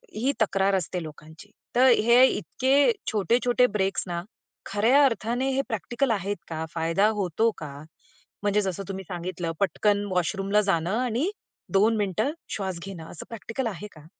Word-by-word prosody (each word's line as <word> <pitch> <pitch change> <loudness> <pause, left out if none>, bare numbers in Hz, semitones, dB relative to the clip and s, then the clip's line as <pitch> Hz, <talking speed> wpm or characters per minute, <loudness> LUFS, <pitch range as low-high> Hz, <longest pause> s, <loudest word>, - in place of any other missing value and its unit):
ही 245 +6 +1
तक्रार 195 -2 +2
असते 180 -1 -2
लोकांची, 155 +5 -12 0.2
तर 255 +2 +6
हे 235 +1 +6
इतके 270 - +2 0.2
छोटे-छोटे 240 +4 +2
ब्रेक 195 -1 0
ना 170 -1 -3 0.4
खऱ्या 235 +8 +4
अर्थाने 245 +1 0
हे 270 +1 +1
प्रॅक्टिकल 240 +4 -1
आहेत 200 -2 -1
का? 160 -1 -4
फायदा 165 +5 +2
होतो 200 +5 +1
का? 150 -3 -7 0.7
म्हणजे 205 0 +2
जसं 195 -1 -3
तुम्ही 195 0 -5
सांगितलं, 175 -1 -4
पटकन 205 +1 +1
वॉशरूमला 195 +3 +1
जाणं 195 0 0
आणि 250 - 0 0.4
2 215 +4 +4
मिनिटं 210 +6 0 0.2
श्वास 190 -4 -3
घेणं, 185 -5 -8
असं 160 - -9
प्रॅक्टिकल 230 +2 -4
आहे 210 0 -6
का? 155 -2 -16
205 Hz, 150 wpm, -26 LUFS, 185-235 Hz, 0.7 s, तर